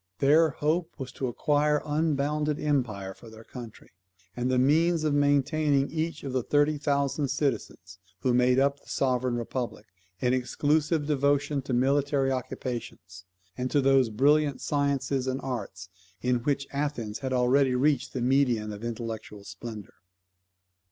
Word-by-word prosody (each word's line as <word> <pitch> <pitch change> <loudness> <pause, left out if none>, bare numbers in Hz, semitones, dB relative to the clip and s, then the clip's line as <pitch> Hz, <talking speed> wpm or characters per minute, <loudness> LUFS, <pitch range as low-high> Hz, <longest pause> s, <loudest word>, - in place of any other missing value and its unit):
Their 155 - +5
hope 160 +4 -1
was 130 -4 -6
to 130 - -3
acquire 150 +4 +1
unbounded 150 -1 0
empire 115 -10 -1
for 115 - -14
their 110 0 -13
country, 120 -2 -11 0.4
and 125 +1 -1
the 130 - +2
means 160 +5 +3
of 155 -2 +1
maintaining 145 0 +2
each 160 0 -3
of 135 -2 -5
the 130 - +1
thirty 145 +4 +2
thousand 140 0 0
citizens 130 - -3 0.2
who 125 - +1
made 125 +1 +3
up 140 +1 +2
the - - -20
sovereign 130 -2 0
republic, 120 -2 -4 0.3
in 125 0 +1
exclusive 145 +4 +1
devotion 145 0 +1
to 130 -1 -4
military 135 +2 +2
occupations, 120 -8 -5 0.3
and 125 0 -2
to 145 - +2
those 135 -3 +4
brilliant 145 +5 +2
sciences 140 -2 -1
and 130 +1 -1
arts 100 -8 -5 0.3
in 125 +2 +1
which 140 +3 -1
Athens 140 -6 -3
already 130 +1 +3
had 125 0 0
reached 145 -2 +1
the 130 - -3
meridian 120 -4 +1
of 105 +2 -9
intellectual 110 -3 -6
splendour. 100 +1 -9
135 Hz, 145 wpm, -27 LUFS, 125-145 Hz, 0.4 s, Their